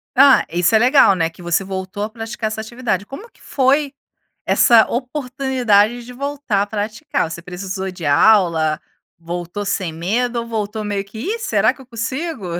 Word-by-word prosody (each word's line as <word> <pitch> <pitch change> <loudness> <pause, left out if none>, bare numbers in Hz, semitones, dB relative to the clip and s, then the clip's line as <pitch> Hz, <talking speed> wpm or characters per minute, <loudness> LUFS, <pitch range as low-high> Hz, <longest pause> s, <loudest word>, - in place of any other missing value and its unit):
Ah, 270 +1 +6
isso 175 +5 +2
é - - +8
legal, 250 -4 +5
né, 165 -2 0
que 170 +2 -17
você 175 +2 0
voltou 190 +1 -5
a 210 - -3
praticar 225 0 -5
essa 220 - -5
atividade, 220 -3 -3
como 400 - -10
que - - -27
foi 280 +1 +1 0.5
essa 230 -2 +5
oportunidade 250 -4 0
de 250 - -10
voltar 275 -6 -1
a - - -2
praticar, 210 - -3
você 170 +1 -7
precisou 190 +2 -5
de 175 -4 -7
aula, 160 -2 +3 0.4
voltou 175 +4 -5
sem 185 -4 -2
medo 230 +9 -1
ou 230 - -7
voltou 215 -1 -3
meio 205 -1 -2
que: 215 +2 -12
"Ih 415 - -3
será 470 - +1
que 270 - -14
eu 255 - -18
consigo?" 255 - -4
220 Hz, 175 wpm, -19 LUFS, 190-250 Hz, 0.5 s, é